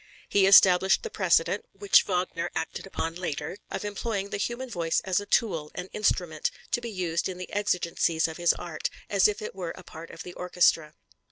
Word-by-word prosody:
He 195 -1 +3
established 190 - +6
the 455 - -5
precedent, 460 - +2
which 405 -1 +4
Wagner 180 -2 -1
acted 160 +4 -4
on 165 0 -2
later, 165 -1 -4
of - - -4
employing 205 -1 -3
the - - -2
human 240 +5 -3
voice 170 -8 0
as 185 -1 0
a 205 - -8
tool, 170 -10 +1
an 180 +1 -6
instrument, 175 -7 0 0.2
to 240 - 0
be 235 - -5
used 180 -4 -2
in 185 - -6
the 180 - -8
exigencies 170 -5 +1
of 160 - -7
his 175 0 +3
art, 160 -3 -4 0.2
as 200 -2 +5
if 210 0 -3
it - - -5
were 180 -3 -5
a 185 - -11
part 165 -1 -11
of - - -9
the 180 - -9
orchestra. 170 -4 +1
180 Hz, 195 wpm, -27 LUFS, 165-205 Hz, 0.2 s, established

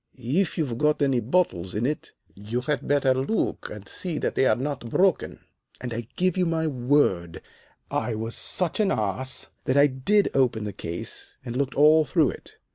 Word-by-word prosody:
'If 145 +10 0
you've 130 -8 -2
got 150 -1 +2
any 135 -3 +2
bottles 110 - 0
in 110 +3 0
it, 150 +3 -3 0.2
you 105 +5 -4
had 145 +1 -2
better 140 -2 +3
look 135 +12 -1
and 105 -2 -9
see 175 -4 -4
that - - -1
they're 135 - +3
not 135 -2 -4
broken.' 190 +6 +1 0.4
"And 125 -2 -5
I 115 -1 -5
give 185 -1 +1
you 180 -1 +2
my 160 -1 0
word, 125 - +1 0.5
I 110 0 -1
was 115 +1 -4
such 180 +1 -1
an 210 -2 +3
ass 110 - -2
that 130 - +1
I 140 - +7
did 145 +10 +2
open 125 -5 +2
the 105 -1 -4
case 85 -3 -5
and 120 - -5
looked 135 0 -1
all 155 +2 +6
through 150 - +2
it. - - -13
130 Hz, 185 wpm, -25 LUFS, 115-155 Hz, 0.5 s, I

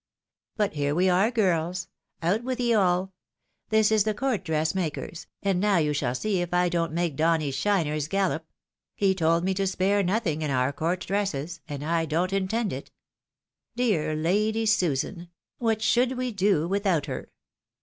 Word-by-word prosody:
But 210 -5 +1
here 145 -1 -1
we 185 +2 +3
are, 190 +5 +3
girls 180 -5 0 0.2
— - - -47
out 200 +8 +1
with 255 0 -3
ye 240 -1 +2
all! 190 -2 +2 0.6
this 220 -1 +3
is 215 -2 +4
the 215 0 -1
court 255 -6 -1
dress 160 -2 0
maker's, 170 -2 -4 0.2
and 195 -2 +1
now 205 -1 +3
you 150 -2 +1
shall 130 -4 -1
see 195 +4 0
if 175 0 -2
I 180 0 +3
don't 170 -1 0
make 170 -2 -1
Donny's 155 -2 +1
shiners 155 -2 0
gallop: 190 -3 0 0.5
he 195 -2 +2
told 165 -2 +2
me 190 +1 +1
to 195 +1 0
spare 195 +2 +1
nothing 180 -5 0
in 155 - -1
our 130 +1 +1
court 170 +5 -1
dresses, 175 -6 -2
and 145 0 -5
I 165 0 +1
don't 170 +5 0
intend 195 +3 0
it. 130 - -7 0.9
Dear 205 -11 +1
Lady 210 +8 +1
Susan! 175 -4 0 0.3
what 225 -2 0
should 245 +3 +2
we 255 -1 -2
do 195 -6 +2
without 195 -5 +1
her - - -6
185 Hz, 175 wpm, -26 LUFS, 160-205 Hz, 0.9 s, is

